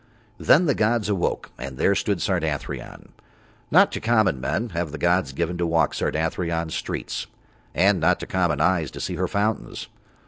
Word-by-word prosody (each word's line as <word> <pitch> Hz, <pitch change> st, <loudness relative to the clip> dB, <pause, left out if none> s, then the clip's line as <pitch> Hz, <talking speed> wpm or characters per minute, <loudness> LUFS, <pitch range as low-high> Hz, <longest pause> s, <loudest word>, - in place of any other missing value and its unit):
Then 170 Hz, +5 st, +5 dB
the 145 Hz, -, +3 dB
gods 110 Hz, -1 st, +1 dB
awoke 95 Hz, -4 st, -1 dB
and 65 Hz, 0 st, -6 dB
there 100 Hz, -, +3 dB
stood 100 Hz, -1 st, -1 dB
Sardathrion. 80 Hz, -6 st, -3 dB, 0.6 s
Not -, -, +5 dB
to -, -, -3 dB
common 110 Hz, -, +2 dB
men 95 Hz, -, -1 dB
have 85 Hz, -4 st, -3 dB
the 80 Hz, -, -5 dB
gods 85 Hz, -1 st, +1 dB
given 85 Hz, +5 st, -2 dB
to 85 Hz, -, +1 dB
walk 80 Hz, 0 st, +2 dB
Sardathrion's 80 Hz, +1 st, -1 dB
streets, -, -, -4 dB, 0.5 s
and 95 Hz, +2 st, +4 dB
not 80 Hz, -, +2 dB
to -, -, -4 dB
common 85 Hz, -6 st, 0 dB
eyes 85 Hz, -3 st, +2 dB
to -, -, -9 dB
see -, -, -3 dB
her -, -, 0 dB
fountains. 105 Hz, +2 st, -2 dB
85 Hz, 170 wpm, -24 LUFS, 80-100 Hz, 0.6 s, Then